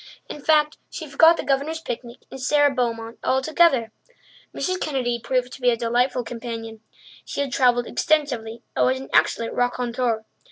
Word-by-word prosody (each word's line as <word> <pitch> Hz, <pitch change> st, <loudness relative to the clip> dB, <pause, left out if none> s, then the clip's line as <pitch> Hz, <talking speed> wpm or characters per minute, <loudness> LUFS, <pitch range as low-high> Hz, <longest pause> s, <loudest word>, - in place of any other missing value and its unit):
In 295 Hz, -, -8 dB
fact, 300 Hz, 0 st, +2 dB
she 315 Hz, -, -7 dB
forgot 325 Hz, +4 st, +5 dB
the -, -, -3 dB
Governor's 285 Hz, +4 st, 0 dB
picnic 240 Hz, -5 st, -7 dB
and 265 Hz, -, -8 dB
Sara 290 Hz, +2 st, +3 dB
Beaumont 230 Hz, -3 st, -2 dB
altogether. 265 Hz, -3 st, +2 dB, 0.6 s
Mrs. 370 Hz, 0 st, -2 dB
Kennedy 250 Hz, -5 st, -1 dB
proved 250 Hz, -1 st, -1 dB
to -, -, -11 dB
be 250 Hz, -, +4 dB
a 235 Hz, -, +1 dB
delightful 245 Hz, +2 st, +1 dB
companion. 230 Hz, -2 st, -7 dB, 0.4 s
She -, -, -4 dB
had 275 Hz, -2 st, -3 dB
travelled 245 Hz, -2 st, +3 dB
extensively 250 Hz, -9 st, -1 dB
and -, -, +3 dB
was 260 Hz, +1 st, +1 dB
an 270 Hz, -, -9 dB
excellent 230 Hz, 0 st, +2 dB
raconteur. 245 Hz, -2 st, -1 dB
250 Hz, 160 wpm, -23 LUFS, 235-285 Hz, 0.6 s, forgot